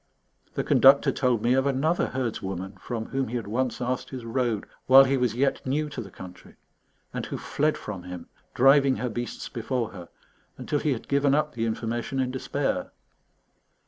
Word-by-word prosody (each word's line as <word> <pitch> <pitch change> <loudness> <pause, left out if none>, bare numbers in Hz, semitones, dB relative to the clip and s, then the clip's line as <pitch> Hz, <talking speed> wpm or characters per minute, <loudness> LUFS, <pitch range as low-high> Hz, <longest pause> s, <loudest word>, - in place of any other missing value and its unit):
The - - 0
Conductor 135 +1 +6
told 125 -5 +1
me 120 - +3
of 135 +1 +2
another 145 +6 +1
herdswoman 95 -6 -4
from 115 0 -4
whom 135 0 -1
he 120 - -5
had 120 - -2
once 120 +4 -1
asked 125 +1 -2
his 130 -3 -7
road 115 -3 -1 0.2
while 135 +1 +9
he 135 0 +1
was 125 -4 0
yet 135 +2 +1
new 150 +3 -1
to 135 - -5
the 100 - -9
country, 90 0 -12 0.6
and - - -3
who - - -4
fled 155 +1 0
from 100 -4 -6
him, 90 -1 -8 0.3
driving 135 +1 +5
her 125 - -2
beasts 120 +1 -5
before 115 0 -3
her, 90 -4 -10 0.5
until 145 - -1
he 150 -1 +1
had 115 - -7
given 140 0 +3
up 150 0 0
the 115 -1 -1
information 115 +4 -3
in 130 -1 0
despair. 130 - -2
125 Hz, 180 wpm, -26 LUFS, 115-135 Hz, 0.6 s, while